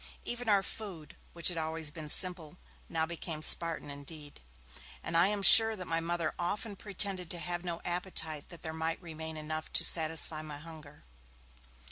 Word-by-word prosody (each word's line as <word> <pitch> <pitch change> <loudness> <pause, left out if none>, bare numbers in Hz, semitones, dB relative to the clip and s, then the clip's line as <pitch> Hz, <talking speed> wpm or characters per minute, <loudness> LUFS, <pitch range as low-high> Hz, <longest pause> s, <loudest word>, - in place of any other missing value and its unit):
Even 240 -1 -3
our 200 -2 +4
food, 190 -10 -8 0.2
which 170 +1 +2
had 175 -2 -2
always 160 -1 -2
been 155 -1 -7
simple, 175 -2 0 0.3
now 160 -1 0
became 160 -1 -6
Spartan 165 -3 +6
indeed, 145 +1 -9 0.6
and 165 - -3
I 170 +3 +6
am 205 -1 -1
sure 225 +3 +9
that 185 -3 -7
my 165 -1 -1
Mother 170 -1 -1
often 200 +4 -3
pretended 195 -3 -2
to 175 - -1
have 175 +1 -4
no 170 -2 -5
appetite 175 -4 -4
that 170 -3 -11
there 160 - -5
might 160 +1 -2
remain 160 -2 -7
enough 155 +1 -5
to - - +2
satisfy 160 -1 +1
my 150 -2 -7
hunger. 155 -1 -12
165 Hz, 170 wpm, -31 LUFS, 155-180 Hz, 0.6 s, sure